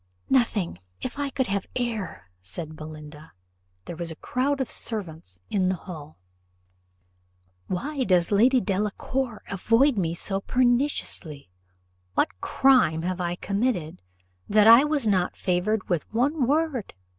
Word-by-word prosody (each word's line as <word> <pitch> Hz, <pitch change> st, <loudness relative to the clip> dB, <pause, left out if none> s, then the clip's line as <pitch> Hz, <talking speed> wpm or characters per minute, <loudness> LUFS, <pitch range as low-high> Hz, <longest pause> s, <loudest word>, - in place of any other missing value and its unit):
"Nothing, 220 Hz, -, +1 dB, 0.2 s
if 255 Hz, +3 st, -5 dB
I 285 Hz, -1 st, -1 dB
could 265 Hz, -1 st, -1 dB
have 200 Hz, -4 st, -2 dB
air," 220 Hz, -, -3 dB
said 95 Hz, -, -5 dB
Belinda. 155 Hz, 0 st, -10 dB, 0.5 s
There 175 Hz, -, -6 dB
was 170 Hz, 0 st, -4 dB
a 160 Hz, -, -4 dB
crowd 275 Hz, -, -1 dB
of 265 Hz, -, -2 dB
servants 160 Hz, -, -4 dB
in 185 Hz, -3 st, +2 dB
the 185 Hz, -, +1 dB
hall. 155 Hz, -4 st, -10 dB, 1.5 s
"Why 275 Hz, +9 st, -2 dB
does 180 Hz, -3 st, +3 dB
Lady 245 Hz, +6 st, +5 dB
Delacour 215 Hz, +4 st, -2 dB
avoid 230 Hz, +6 st, +2 dB
me 165 Hz, -2 st, -1 dB
so 195 Hz, +2 st, -2 dB
pertinaciously? 245 Hz, -, 0 dB, 0.6 s
What 90 Hz, 0 st, 0 dB
crime 255 Hz, -12 st, +3 dB
have 180 Hz, +1 st, -2 dB
I 175 Hz, 0 st, -1 dB
committed, 200 Hz, -, -2 dB, 0.5 s
that 210 Hz, 0 st, +5 dB
I 230 Hz, +4 st, +9 dB
was 295 Hz, -4 st, 0 dB
not 185 Hz, -4 st, +1 dB
favoured 190 Hz, +3 st, 0 dB
with 175 Hz, -5 st, -2 dB
one 260 Hz, +4 st, +1 dB
word?" 295 Hz, -, 0 dB
200 Hz, 135 wpm, -25 LUFS, 170-255 Hz, 1.5 s, I